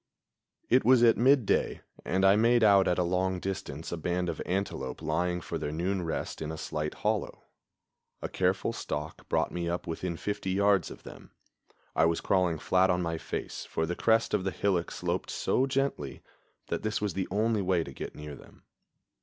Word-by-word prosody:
It 130 +2 +4
was 125 -1 +5
at 115 -1 +6
midday, 130 -2 +3 0.2
and 95 +2 +1
I 95 +1 +7
made 115 +2 +4
out 100 -2 +6
at 90 - +2
a 90 - +2
long 90 +1 0
distance 85 -5 -5
a 85 - -2
band 90 +2 -1
of - - -4
antelope 90 -9 -2
lying 90 +3 -1
for 85 - -4
their 75 -1 -3
noon 90 +4 -1
rest 80 -1 -4
in 80 0 -3
a 80 - -6
slight 75 0 -3
hollow. - - -1 0.8
A - - -4
careful - - 0
stalk 75 +1 -5
brought - - +1
me 85 -1 -2
up 85 +1 -3
within 85 +1 -3
fifty 100 0 -3
yards 100 +1 +3
of - - -11
them. - - -12 0.7
I 80 - +4
was 85 0 +1
crawling 90 -4 +1
flat 95 +4 +2
on 90 0 +1
my 85 -1 -2
face, - - -5
for 80 - -1
the 90 +2 -3
crest 115 +3 +2
of 105 -3 +2
the 95 - 0
hillock 95 -3 0
sloped - - -3
so 130 - +1
gently 135 - -2 0.5
that - - -1
this 110 0 -1
was 105 -3 -2
the 95 +1 -2
only 110 +2 +1
way 90 -3 +1
to 70 - -9
get - - -7
near 75 -1 -8
them. - - -15
90 Hz, 195 wpm, -29 LUFS, 80-100 Hz, 0.8 s, I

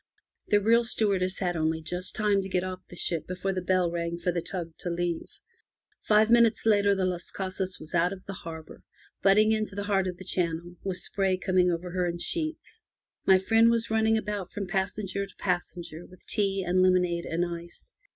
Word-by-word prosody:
The 205 - +4
real 230 +3 +4
stewardess 195 -5 0
had 175 -2 -1
only 160 0 0
just 180 +3 -2
time 210 -2 +2
to 195 - -6
get 180 -1 0
off 185 0 -6
the - - -12
ship 170 -2 0
before 185 +1 -2
the 185 - -2
bell 180 -1 +1
rang 170 0 -2
for 175 +1 -1
the 170 0 -2
tug 170 -2 -5
to 175 - -4
leave. 170 -1 -2 0.7
Five 215 +1 +4
minutes 235 -2 +4
later 205 -2 +4
the 190 -1 0
Las 180 -1 -3
Casas 190 -1 -3
was 155 - -10
out 175 +2 +3
of 190 -1 -8
the 195 - -6
harbour, 160 -3 -9 0.4
butting 210 +2 +5
into 215 -2 -1
the 200 - -3
heart 195 -2 +1
of 180 -1 -4
the 185 - -11
channel, 170 0 -2
with 190 -2 -2
spray 190 -1 0
coming 185 -1 +2
over 175 +1 -3
her 180 0 0
in 170 0 -2
sheets. 320 - -3 0.5
My 190 - +7
friend 225 +4 +4
was 230 -1 0
running 220 0 +3
about 205 -3 -4
from 205 - -4
passenger 195 +1 -2
to - - -19
passenger 175 -2 -3
with 185 - -16
tea 195 -3 0
and 180 +1 +2
lemonade 180 -2 +2
and 170 +2 0
ice. 170 - -8
185 Hz, 200 wpm, -28 LUFS, 175-205 Hz, 0.7 s, My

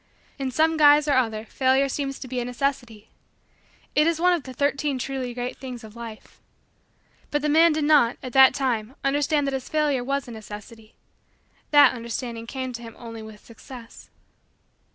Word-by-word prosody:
In 270 -1 -2
some 315 +5 +2
guise 295 0 +6
or 290 - +3
other 225 -4 0
Failure 265 +3 +2
seems 275 0 -3
to 260 - -9
be 250 0 -3
a 240 - -3
necessity. 245 -4 -3 0.8
It 300 +1 +3
is 335 -1 0
one 360 +1 +4
of 345 - 0
the 260 - -10
Thirteen 280 +1 -1
Truly 255 -1 -4
Great 245 +1 -4
Things 250 -3 -8
of 220 0 -12
Life. 230 -2 -11 0.9
But 295 0 -1
the 300 - +1
man 325 +3 +5
did 305 0 -1
not, 290 -6 +4
at 255 - -7
that 265 -1 +7
time, 250 -2 -2
understand 290 +1 +1
that 275 - -2
his 265 -1 -4
failure 295 -5 +1
was 275 +1 -2
a - - -8
necessity. 215 0 -11 0.7
That 290 -1 +6
understanding 235 -1 -5
came 260 0 -5
to 235 - -7
him 230 -1 -10
only 230 -1 -9
with 220 -1 -12
Success. 230 0 -13
260 Hz, 180 wpm, -24 LUFS, 235-285 Hz, 0.9 s, that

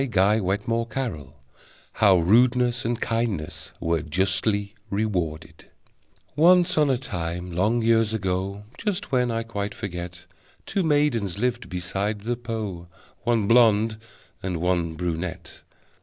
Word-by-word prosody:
How 100 -3 +5
Rudeness 120 +6 +3
and 120 0 -1
Kindness 115 -9 -2
Were 85 -1 0
Justly 95 +5 0 0.2
Rewarded 85 -6 -3 0.7
Once 175 +3 +5
on 150 -2 +3
a 130 - +2
time, 90 -6 -4
long 105 +7 +1
years 115 -1 +3
ago 95 -1 -2 0.2
(Just 205 -5 -2
when 125 -2 +2
I 115 0 -1
quite 105 -2 -4
forget), 90 -2 -6 0.4
Two 195 - -1
maidens 145 - +1
lived 120 +2 -1
beside 95 +4 -2
the 120 +3 -1
Po, 110 -7 -5 0.4
One 115 -4 +2
blonde 110 -2 +4 0.4
and 90 -2 -2
one 85 -1 0
brunette. 85 0 -4
105 Hz, 110 wpm, -25 LUFS, 90-120 Hz, 0.7 s, How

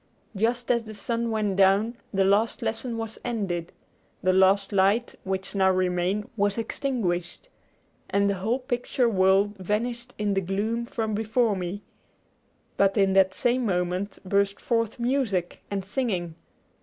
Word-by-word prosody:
Just 235 +4 0
as 235 -2 +1
the 215 0 -8
sun 230 +3 -1
went 210 -3 -1
down 200 +4 +4 0.2
the 195 -1 +2
last 205 +4 +2
lesson 230 +1 -2
was 225 -1 -5
ended, 195 -8 -3 0.5
the 185 0 +3
last 190 +2 +4
light 200 +4 +2
which 190 0 -3
now 190 -1 +3
remained 185 +2 0
was 205 -1 +1
extinguished, 225 - -2 0.6
and 200 0 +2
the 200 - +2
whole 225 +5 +1
picture 250 -1 -1
world 195 0 +3
vanished 235 +5 -3
in 210 -1 0
the 195 - +1
gloom 215 +6 -2
from 220 -2 -2
before 220 +1 +1
me; 185 +2 -4 0.9
but 195 +1 +3
in 195 -1 +3
that 190 0 +4
same 245 +1 +1
moment 180 -1 -1
burst 200 +1 +1
forth 230 -2 -1
music 235 -8 -1
and 195 -2 -3
singing. 195 -7 -2
205 Hz, 145 wpm, -26 LUFS, 190-230 Hz, 0.9 s, down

